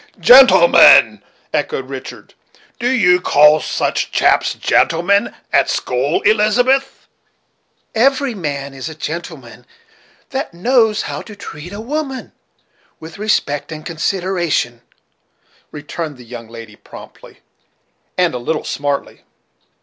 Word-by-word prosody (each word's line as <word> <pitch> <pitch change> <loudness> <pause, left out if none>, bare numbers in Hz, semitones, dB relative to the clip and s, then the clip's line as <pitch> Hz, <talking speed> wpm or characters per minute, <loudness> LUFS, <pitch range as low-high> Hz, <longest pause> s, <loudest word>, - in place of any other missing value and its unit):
"Gentleman!" 265 - +6 0.3
echoed 460 0 -2
Richard; - - -10 0.5
"do 245 +1 0
you 180 -8 +3
call 150 -1 +5
such - - -2
chaps - - +1
gentlemen, 175 +5 +1 0.2
at - - +3
school, 130 +5 -1
Elizabeth?" 245 +6 +1 0.9
"Every 270 +3 +1
man 140 -7 -5
is 135 +3 -7
a 160 - -10
gentleman 155 -6 -8 0.7
that - - -5
knows 225 +2 +1
how - - -6
to 210 - -12
treat 170 -3 -10
a 200 - -8
woman 270 +2 -5 0.7
with 160 +3 -12
respect 165 -9 -1
and 155 0 -8
consideration," 170 -8 -2 0.9
returned 150 0 -7
the 125 - -14
young 115 -1 -10
lady 115 -2 -11
promptly, - - -15 0.8
and 180 -2 +1
a 125 - -4
little 150 +6 -3
smartly. 140 0 -4
170 Hz, 110 wpm, -16 LUFS, 145-220 Hz, 0.9 s, Gentleman